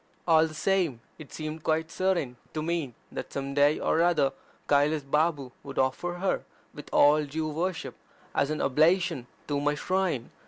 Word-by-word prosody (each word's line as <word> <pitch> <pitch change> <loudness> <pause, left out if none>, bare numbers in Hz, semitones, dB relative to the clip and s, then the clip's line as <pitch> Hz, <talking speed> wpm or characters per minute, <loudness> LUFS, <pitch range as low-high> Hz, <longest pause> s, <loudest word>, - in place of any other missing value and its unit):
All 160 -1 +5
the 155 - -10
same, 175 -7 +1 0.2
it 155 - -11
seemed 155 0 -5
quite 160 +1 0
certain 175 -11 0 0.2
to 155 - -1
me 160 -7 -2 0.2
that - - -6
some 140 0 -4
day 145 +2 +4
ox 165 - +2
other 155 -6 +3 0.3
Kailas 145 +1 +3
Babu 150 -1 0
would 135 -1 -9
offer 130 +7 0
her, 190 +2 -1 0.3
with 145 - -10
all 150 +1 +5
due 155 +2 -3
worship, 165 +2 -3 0.4
as 140 - +1
an 155 - -2
oblation 155 -1 +2 0.2
at 145 - -1
my 145 +1 +1
shrine. 180 -6 -1
155 Hz, 165 wpm, -28 LUFS, 140-170 Hz, 0.4 s, All